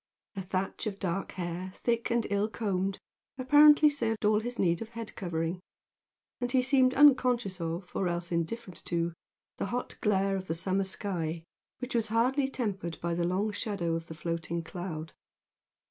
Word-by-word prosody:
A 195 - -3
thatch 190 +4 -2
of 200 -2 -3
dark 195 0 -2
hair, 180 +1 -4
thick 235 -1 0
and 235 -1 +1
ill 200 +1 +2
combed, 195 -3 -1 0.4
apparently 295 +3 +7
served 230 -7 0
all 210 0 +4
his 240 +2 -4
need 170 -2 +2
of 225 - -5
head 230 -2 -7
covering, 170 -1 -2 0.8
and 245 -1 -2
he 255 -1 +3
seemed 260 -1 +4
unconscious 250 -9 +4
of, 165 +2 -3
or 190 - +1
else 175 0 -3
indifferent 180 +4 -3
to, 170 -1 -1 0.4
the - - -2
hot 245 +5 -4
glare 195 -2 +2
of 190 0 -6
the 165 - -1
summer 190 +3 0
sky 170 -4 -3 0.3
which 250 +1 -5
was 230 -2 +1
hardly 250 +5 +2
tempered 195 -10 -3
by 170 0 -1
the 170 0 0
long 195 +4 0
shadow 200 -6 -2
of 165 0 -3
the 160 - -8
floating 170 0 -3
cloud. 165 -2 -6
195 Hz, 170 wpm, -30 LUFS, 170-235 Hz, 0.8 s, apparently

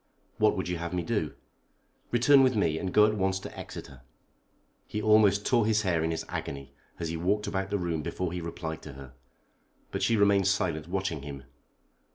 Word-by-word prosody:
"What - - +3
would - - -2
you 90 -1 -2
have 85 +1 -4
me 90 - -1
do?" 95 -10 -2 0.7
"Return 135 +4 +5
with 130 -2 +3
me, 80 -6 +1
and 95 - -3
go 105 +2 +6
at 110 - +2
once 95 -2 0
to - - -9
Exeter." 65 -2 -9 0.9
He 105 - -3
almost 105 -2 +4
tore 120 -4 +3
his 110 0 +2
hair 85 -4 +1
in 80 - 0
his 80 - -3
agony 70 0 -6 0.3
as 85 -2 -3
he 85 - -3
walked 100 +5 0
about 95 0 -2
the 100 - 0
room 85 -4 -2
before 90 +3 -3
he 90 - -3
replied 85 -1 -5
to - - -9
her. 65 -2 -11 0.8
But - - -3
she 115 - +2
remained 100 -2 +4
silent, 85 -6 0
watching 95 -4 -2
him. 70 -1 -8
90 Hz, 200 wpm, -28 LUFS, 80-105 Hz, 0.9 s, go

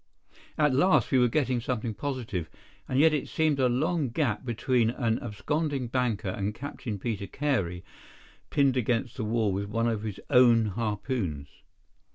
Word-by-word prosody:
At 150 -3 +3
last 150 - +3
we 130 - +4
were 125 - +5
getting 130 -1 0
something 115 -2 -2
positive, 115 - -4 0.4
and 130 - 0
yet 160 +1 +6
it 150 - -1
seemed 155 -3 +1
a 130 -1 +3
long 150 +3 0
gap 120 -2 -1
between 120 -1 +1
an 115 -2 0
absconding 135 +4 -2
banker 115 -6 -1
and 100 +2 -3
Captain 125 -5 -5
Peter 100 -1 -3
Carey 100 -12 -1 0.7
pinned 135 -2 +2
against 120 0 0
the 125 - -3
wall 110 -1 +1
with 100 +2 -2
one 115 +2 0
of 110 -3 -1
his 105 -2 -5
own 120 -3 +6
harpoons. 105 - -3
120 Hz, 160 wpm, -28 LUFS, 105-135 Hz, 0.7 s, yet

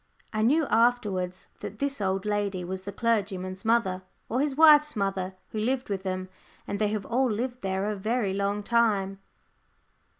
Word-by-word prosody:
I 215 - 0
knew 290 +8 +3
afterwards 210 -8 +1
that 215 - -7
this 280 -2 -2
old 190 0 0
lady 205 -3 -1
was 185 +1 -5
the 200 - -4
clergyman's 195 -4 -1
mother 220 -5 +2 0.3
or 245 +4 +1
his 285 -2 0
wife's 300 -1 +7
mother, 195 -2 -2
who 215 - -4
lived 255 +3 -1
with 195 -2 -2
them, 185 -1 -3 0.4
and 200 - -4
they 215 - +2
have 205 -2 -2
all 255 +2 +1
lived 245 +3 -3
there 190 0 -1
a 210 - -1
very 215 0 -1
long 200 +1 -1
time. 205 -4 +1
205 Hz, 170 wpm, -27 LUFS, 190-235 Hz, 0.4 s, wife's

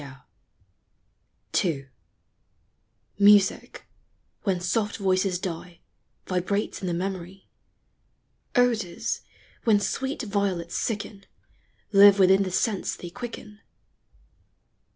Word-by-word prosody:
SHAKESPE 130 -2 -12 1.3
TO 145 -8 0 1.3
Mrsir, 205 -1 +4 0.6
when 190 -4 0
soft 205 +4 -1
voices 190 -2 +1
die, 175 -1 -6 0.5
Vibrates 190 +4 -2
in 185 - -3
the 175 - -1
memory, 185 +1 -5 0.6
— - - -45
OdorS, 230 -8 0 0.4
Wild! 210 -4 +3
sweet 265 +4 -2
Violets 200 -5 -2
sicl 205 -2 -4 0.7
Live 200 0 +8
within 190 0 +5
the 190 - -1
sense 195 +2 -1
they 175 - -9
quicken. 225 -2 -8
195 Hz, 90 wpm, -25 LUFS, 180-210 Hz, 1.3 s, Live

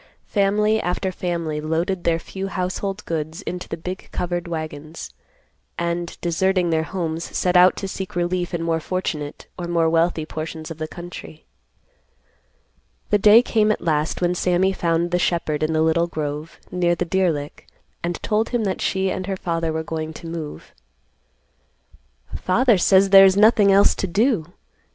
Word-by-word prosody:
Family 210 +2 +2
after 185 +2 -2
family 170 -4 -3
loaded 170 +4 -1
their 165 -1 +3
few 190 +3 -6
household 195 +2 -3
goods 160 +3 -4
into 180 0 -6
the 165 - -4
big 180 +3 -7
covered 175 -1 -3
wagons, 155 -1 -6 0.7
and, 170 0 -3
deserting 180 +1 +1
their 160 -1 +2
homes, 165 -1 -3
set 180 0 +1
out 180 +1 +7
to 195 - -4
seek 190 -1 -6
relief 175 0 -1
in 170 -2 -2
more 165 -1 0
fortunate 155 -4 -4
or 175 - -4
more 170 -1 +2
wealthy 165 -1 +1
portions 160 +1 -6
of 165 - -8
the 155 - -3
country. 175 -2 -10 1.7
The 210 - +4
day 215 +4 +7
came 215 -3 +2
at - - -1
last 155 +1 -1
when 175 0 +2
Sammy 180 +2 +1
found 170 -1 0
the 180 - +1
shepherd 165 -4 0
in 155 +1 +1
the 160 0 +2
little 165 +1 +2
grove, 150 0 -5
near 175 -1 +1
the 180 - -2
deer 185 0 +2
lick, 145 -1 -7 0.4
and 175 0 -1
told 215 +1 0
him 240 -2 0
that 190 -3 -2
she 190 -1 0
and 185 0 -4
her 195 -1 -2
father 165 -2 -2
were 160 0 -2
going 160 0 -4
to 170 - -11
move. 160 - -7 1.6
"Father 230 +2 +3
says 190 +2 +4
there 195 -1 +10
is 190 0 +4
nothing 210 -1 +5
else 200 +1 +5
to 195 - -3
do. 205 - +1
175 Hz, 170 wpm, -22 LUFS, 160-190 Hz, 1.7 s, there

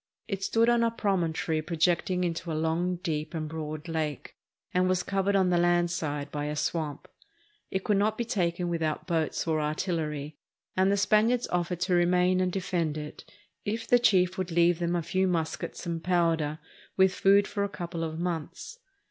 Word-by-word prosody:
It 195 -2 -3
stood 230 +3 +3
on 240 0 +4
a 230 - +3
promontory 175 -7 0
projecting 175 +3 +1
into 170 0 -2
a 155 - -1
long, 165 +3 0
deep, 155 +1 -3
and 155 -1 -3
broad 155 0 -6
lake, 155 -4 -3 0.4
and 185 0 +2
was 185 -1 +1
covered 195 +1 0
on 190 -2 +3
the 175 - +3
land 175 0 +3
side 145 -4 -3
by 145 0 -3
a 150 0 -3
swamp. 150 -2 -2 0.6
It 190 0 -2
could 210 -2 +2
not 215 +2 +1
be 235 - -1
taken 175 -5 -1
without 165 -2 -2
boats 165 -3 -1
or 155 -1 +1
artillery, 150 -2 -3 0.4
and 190 +1 +3
the 200 - +2
Spaniards 215 +5 +3
offered 175 0 -1
to 185 - +1
remain 180 +1 +3
and 185 0 +1
defend 175 -5 -1
it 150 0 -8 0.3
if 225 +2 -3
the 245 - +5
chief 185 -5 +3
would 185 -1 -2
leave 170 0 +3
them 175 0 0
a 170 - -1
few 185 +3 +1
mus 165 -3 0
kets - - -7
and 165 -1 -3
powder, 165 -4 +1 0.4
with 190 -1 +5
food 200 +1 +4
for 200 - -2
a 200 - -1
couple 170 -3 -5
of 160 -1 -4
months. 180 - -4
175 Hz, 190 wpm, -28 LUFS, 160-190 Hz, 0.6 s, the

